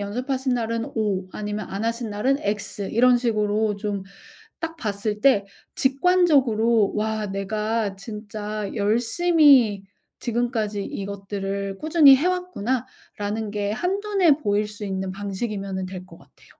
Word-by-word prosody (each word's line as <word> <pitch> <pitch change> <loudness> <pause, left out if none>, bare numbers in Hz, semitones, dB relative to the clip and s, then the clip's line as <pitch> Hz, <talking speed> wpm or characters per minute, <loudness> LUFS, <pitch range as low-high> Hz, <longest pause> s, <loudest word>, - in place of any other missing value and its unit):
연습하신 255 +5 -2
날은 230 -1 -2
O 195 -4 -1
아니면 210 0 -4
안 200 +3 -3
하신 230 -1 -2
날은 255 +7 +1
X 205 0 -3
이런 245 +2 +5
식으로 215 -2 0
좀 200 -1 -3 0.6
딱 325 0 -4
봤을 210 -4 -3
때 210 -7 +4 0.3
직관적으로 265 - +3
'와 215 0 -1
내가 210 +1 -2
진짜 210 -1 -6
열심히 235 - +4 0.4
지금까지 230 -4 -1
이것들을 195 0 -4
꾸준히 310 -3 +7
해 280 +6 +1
왔구나.'라는 235 - -3
게 205 0 -2
한눈에 380 - +2
보일 205 +1 +1
수 210 0 -8
있는 190 -1 -3
방식이면은 195 -1 -4
될 185 0 -8
것 - - -14
같아요. - - -22
215 Hz, 270 characters per minute, -24 LUFS, 200-250 Hz, 0.6 s, 꾸준히